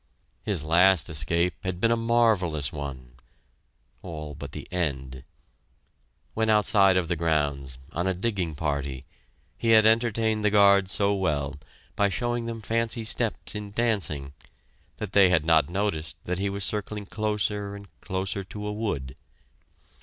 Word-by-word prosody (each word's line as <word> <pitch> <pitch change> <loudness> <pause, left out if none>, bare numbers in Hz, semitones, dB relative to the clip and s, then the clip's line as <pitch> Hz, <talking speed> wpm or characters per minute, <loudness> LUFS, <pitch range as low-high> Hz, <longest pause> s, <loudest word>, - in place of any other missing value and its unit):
His 95 -8 -1
last 90 0 +4
escape 85 +4 +1
had 95 -1 -3
been 115 +4 +2
a - - +4
marvellous 110 - +1
one 70 -4 -7 0.9
all 75 -4 -7
but 70 0 -8
the - - -8
end. 65 -7 -3 1.1
When 110 0 0
outside 100 -3 +4
of 90 -2 0
the 85 - 0
grounds, 75 -5 -1 0.2
on 85 +2 -1
a 95 - 0
digging 95 -5 -2
party, 70 -3 -3 0.5
he - - -2
had 110 - +5
entertained 110 -1 +2
the 105 - +4
guards 100 -2 +5
so 100 -1 +3
well, 75 -8 -1 0.4
by 100 0 +2
showing 120 +2 -2
them 115 -1 -6
fancy 115 +1 -1
steps 110 0 0
in 105 -1 -5
dancing, 100 -11 -1 0.6
that 105 -2 -6
they 100 -2 +6
had 80 -4 +2
not 80 -3 +4
noticed 85 -4 -2
that 90 +1 -3
he 100 0 0
was 100 0 -3
circling 105 0 -2
closer 105 -1 -2
and 100 0 -11
closer 95 +1 -3
to 105 +2 -8
a 105 - -3
wood. 75 - -3
95 Hz, 150 wpm, -26 LUFS, 80-105 Hz, 1.1 s, they